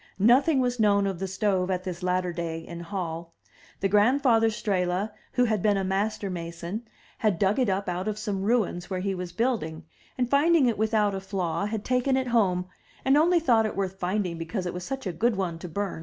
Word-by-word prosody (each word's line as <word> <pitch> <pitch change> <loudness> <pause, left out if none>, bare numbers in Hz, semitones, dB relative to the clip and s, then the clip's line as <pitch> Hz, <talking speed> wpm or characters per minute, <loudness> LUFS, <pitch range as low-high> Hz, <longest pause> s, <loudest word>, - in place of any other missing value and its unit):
Nothing 265 +8 +4
was 245 -1 0
known 200 -2 +4
of 190 -3 -2
the 195 - -2
stove 190 -1 0
at 185 -1 -1
this 180 -1 -5
latter 180 -1 0
day 165 -1 -3
in 170 +1 -8
Hall. 170 -2 -5 0.5
The 195 - +3
grandfather 225 +3 +4
Strehla, 195 -1 -1 0.2
who 250 - +3
had 215 -4 0
been 205 0 +3
a 195 - 0
master 200 +2 -1
mason, 170 +5 -5 0.3
had 210 -5 +1
dug 195 +6 +2
it 250 -5 +2
up 195 +1 -1
out 180 +2 -2
of 210 -1 -2
some 205 -2 -3
ruins 200 -5 0
where 185 -2 -2
he 195 +1 -1
was 180 -1 -5
building, 175 -8 -2 0.3
and, 250 -1 +1
finding 290 +3 +4
it 235 -4 0
without 215 -2 +2
a 195 - -2
flaw, 190 -1 -2
had 215 -1 -4
taken 255 +1 +2
it 260 -1 -1
home, 185 -6 +2 0.4
and 270 +1 +5
only 340 +4 +4
thought 230 -9 +3
it - - -6
worth 190 -1 -3
finding 180 -2 -1
because 180 +3 -3
it 175 - -3
was 180 - -5
such 270 +5 -5
a 185 - -2
good 230 +7 +1
one 175 -4 -2
to 180 - -7
bum. 200 +1 -3
200 Hz, 215 wpm, -26 LUFS, 180-225 Hz, 0.5 s, and